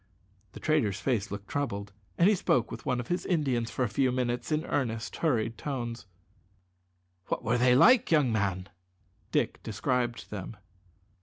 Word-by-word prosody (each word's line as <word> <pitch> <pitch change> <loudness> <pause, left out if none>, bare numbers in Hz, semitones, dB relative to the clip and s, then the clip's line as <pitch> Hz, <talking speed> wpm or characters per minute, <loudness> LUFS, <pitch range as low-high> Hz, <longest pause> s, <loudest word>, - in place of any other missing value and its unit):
The - - -9
trader's 145 -11 +1
face 120 -7 0
looked 100 0 -7
troubled, 100 -9 -3 0.2
and 170 - +5
he 210 - +6
spoke 125 - +1
with - - -8
one 125 -2 +1
of 120 - -6
his 175 - 0
Indians 130 -9 0
for 130 - -1
a - - +1
few 125 +5 +1
minutes 125 +2 -2
in 155 +1 0
earnest, 115 -5 -2
hurried 115 -8 0
tones. 120 -6 -4 1.2
"What - - -2
were 120 +2 +1
they 125 0 +5
like, 240 - +6
young 150 -7 +4
man?" 100 -3 -1 0.6
Dick - - 0
described 120 +2 -2
them. 105 +1 -6
120 Hz, 160 wpm, -29 LUFS, 110-140 Hz, 1.2 s, he